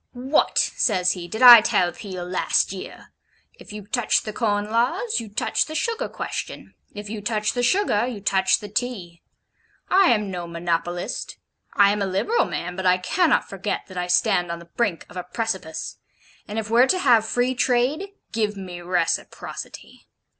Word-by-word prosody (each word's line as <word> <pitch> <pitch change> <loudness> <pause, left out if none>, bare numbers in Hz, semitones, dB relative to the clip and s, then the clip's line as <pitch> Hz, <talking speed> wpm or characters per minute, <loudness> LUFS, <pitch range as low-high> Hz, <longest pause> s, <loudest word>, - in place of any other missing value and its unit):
'What,' 265 +4 0
says 185 -5 +2
he, 175 -2 -5
'did 220 +7 -3
I 240 -2 +12
tell 180 -4 +1
Peel 185 0 -7
last 180 +1 +1
year? 190 - -10 0.5
If - - -13
you 210 -1 -8
touch 240 +1 +1
the 215 - -6
Corn 210 -2 -1
Laws, 245 - 0
you 225 -2 -8
touch 205 - 0
the 310 - -7
Sugar 455 +8 -2
Question; - - -6 0.2
if 205 0 -7
you 210 0 -6
touch 215 0 -1
the 245 - -1
Sugar, 245 - +2
you 240 -5 -5
touch 190 -1 +2
the 210 - -7
Tea. 205 -6 -4 0.7
I 380 0 +5
am 210 -4 +1
no 175 -2 -5
monopolist. 170 +1 -3 0.4
I 200 -1 +5
am 205 0 -2
a 200 - 0
liberal 195 - +1
man, 180 +1 -5
but 190 0 -2
I 180 0 +4
cannot 320 - +1
forget 195 +1 -3
that 185 - -10
I 180 - -2
stand 180 0 +2
on 170 - -4
the 170 0 -15
brink 205 -8 -1
of 180 - -12
a 180 - -3
precipice; 190 -4 -4 0.5
and 210 - -6
if 220 -1 -2
were 245 +3 +5
to 370 - +2
have 240 -10 +4
Free 245 +3 0
Trade, 260 +8 0 0.2
give 210 -2 -1
me 180 -2 -8
reciprocity. 175 -1 -4
205 Hz, 180 wpm, -23 LUFS, 180-240 Hz, 0.7 s, I